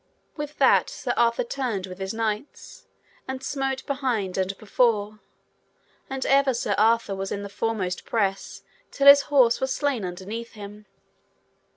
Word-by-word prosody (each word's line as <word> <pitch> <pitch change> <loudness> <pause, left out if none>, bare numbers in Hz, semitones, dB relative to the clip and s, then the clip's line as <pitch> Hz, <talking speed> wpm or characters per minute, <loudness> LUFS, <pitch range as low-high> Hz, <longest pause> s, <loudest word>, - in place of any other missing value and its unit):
With 295 -1 -6
that - - +4
Sir 245 - -3
Arthur 235 -1 +2
turned 235 -6 -3
with 185 0 -10
his 190 0 -3
knights, 225 +3 -5 0.4
and 265 0 -5
smote 270 -1 -3
behind 250 -9 -2
and 190 0 -2
before, 215 -1 0 0.9
and 265 -1 -3
ever 275 -2 +3
Sir 220 -3 -1
Arthur 220 -1 +2
was 195 0 -5
in 200 - -3
the 200 - -7
foremost 200 -3 -2
press 195 -4 -2 0.3
till 280 - -2
his 280 0 +10
horse 255 -5 +4
was 265 0 -1
slain 280 -7 -1
underneath 195 +6 -6
him. 210 -1 -11
225 Hz, 150 wpm, -25 LUFS, 200-265 Hz, 0.9 s, his